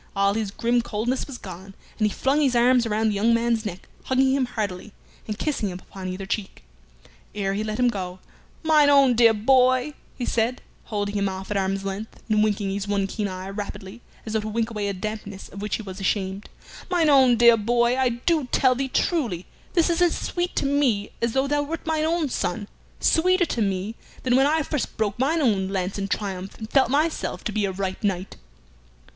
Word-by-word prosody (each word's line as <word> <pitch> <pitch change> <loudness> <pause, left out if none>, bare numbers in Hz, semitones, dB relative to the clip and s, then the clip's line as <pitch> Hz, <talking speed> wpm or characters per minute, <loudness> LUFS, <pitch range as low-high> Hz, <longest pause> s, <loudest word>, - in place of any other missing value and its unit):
All 200 0 +3
his 215 -1 -2
grim 235 +4 +1
coldness 235 +3 -2
was 275 -3 -7
gone, 190 0 -10 0.2
and 215 - +3
he - - 0
flung 275 +7 +1
his 265 -4 +2
arms 240 0 +4
around 220 0 +1
the - - 0
young 225 +4 +3
man's 230 -1 0
neck, 190 -1 -8 0.2
hugging 265 0 +3
him 270 -2 +1
heartily, 205 -3 -4 0.3
and 210 -1 -4
kissing 270 -9 -1
him 180 - -6
upon 190 0 -9
either 185 +1 -5
cheek. 195 - -4 0.7
Ere 195 -2 -1
he 205 +2 -1
let 215 0 -3
him 250 0 +3
go, 185 -5 -3 0.5
"Mine 305 -2 +5
own 275 -3 +6
dear 230 -1 +6
boy," 255 +5 +3 0.2
he 245 - -2
said, 235 +2 0 0.2
holding 205 -2 -2
him 200 -1 0
off 190 +1 -7
at 205 - 0
arm's 195 0 -1
length, 195 +3 -5
and 215 -2 +3
winking 205 -2 0
his 200 0 -3
one 200 -1 +1
keen 205 +1 -3
eye 185 0 -6
rapidly, 205 +1 -7 0.2
as 220 - -5
though 220 - +2
to 215 - -5
wink 225 +1 -1
away 210 -2 -2
a 200 - -1
dampness 205 0 -6
of 200 - -9
which 210 -1 -1
he 220 - -5
was 190 -1 -8
ashamed 195 0 -2 0.4
"mine 350 -3 +2
own 265 -4 +6
dear 235 0 +7
boy, 235 +2 +2
I 260 -1 +2
do 275 +6 0
tell 260 -1 +4
thee 270 +2 -2
truly 240 - 0 0.3
this 335 -3 +3
is 340 +1 0
as 350 -1 +3
sweet 355 0 -3
to - - 0
me 275 -8 +1
as 235 -1 0
though 265 0 +2
thou 290 +1 +1
wert 315 +3 -5
mine 315 -1 0
own 325 -1 +1
son; 200 -2 -2 0.3
sweeter 365 +2 +3
to 235 - -2
me 195 +1 -1 0.3
than 250 -1 +2
when 270 +2 +5
I 315 +1 +2
first 295 -2 -3
broke 215 0 -1
mine 310 +5 +2
own 200 -8 +2
lance 190 0 -2
in 195 - -2
triumph, 195 -2 -4
and 220 - -7
felt 265 +3 +3
myself 305 +4 0
to 215 - -2
be 210 -1 0
a 195 - -1
right 190 +1 -4
knight." 190 -2 -2
220 Hz, 215 wpm, -24 LUFS, 200-260 Hz, 0.7 s, dear